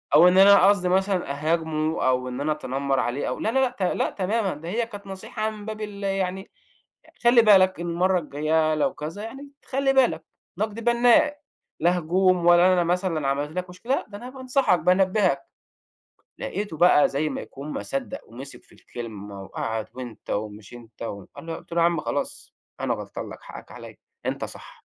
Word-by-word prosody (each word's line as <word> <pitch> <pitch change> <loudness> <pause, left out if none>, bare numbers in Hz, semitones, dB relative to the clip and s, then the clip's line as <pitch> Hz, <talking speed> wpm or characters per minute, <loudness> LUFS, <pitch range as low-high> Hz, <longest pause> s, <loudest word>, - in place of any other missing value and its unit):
أو 170 +4 +8
إن 180 +1 +4
أنا 195 -1 +8
قصدي 185 -3 +2
مثلًا 190 -4 +1
أهاجمه 155 +1 -1
أو 125 0 +1
إن 125 +2 -5
أنا 155 +2 0
أتنمّر 140 -2 -1
عليه 125 +4 -1
أو - - -4
لا، 220 - 0
لا، 265 - +2
لأ، 260 - +3
ت 205 - -13
لا 180 - +1
تمامًا 200 +1 -1
ده 160 +3 -8
هي 230 +5 0
كانت 205 -3 -10
نصيحة 215 +3 -4
من 210 -1 -10
باب 215 0 -6
ال 205 -1 -6
يعني 190 -1 -2 0.7
خلِّ 240 -1 +6
بالك 190 -3 +5
إن 175 - -3
المرّة 180 +2 +2
الجايّة 155 +1 0
لو 150 - +1
كذا 165 +8 -6
يعني 270 +5 -8 0.2
خلِّ 270 0 +1
بالك 240 -11 +3 0.3
نقد 215 +1 -2
بنّاء، 245 +5 +4 0.4
لا 175 +2 +3
هجوم 180 +1 +2
ولا 175 +2 +6
أنا 175 - +3
مثلًا 175 -4 0
عملت 145 +2 -1
لك 180 0 -3
مشكلة، 230 +10 -2
ده 205 - -8
أنا 245 +4 -8
بانصحك 260 - +1
بانبّهك، 185 +3 +2 1.0
لقيته 205 -6 -4
بقى 175 -3 +5
زي 150 +3 -1
ما - - -4
يكون 140 +2 -9
ما - - -4
صدّق 275 0 -4
ومسك 130 +4 -10
في - - -25
الكلمة 105 -4 -8
وقعد 110 +2 -4
وأنت 120 -4 -9
ومش 105 +1 -5
أنت 115 -2 -14 0.4
أنا 165 0 -6
قلت - - -11
له: 170 - +2
"يا - - +5
عم 170 -3 +1
خلاص 145 - -4 0.3
أنا - - 0
غلطان - - -6
لك - - -10
حقك - - -11
عليّا، - - -11 0.3
أنت - - -2
صح." - - -12
180 Hz, 185 wpm, -24 LUFS, 150-205 Hz, 1.0 s, أو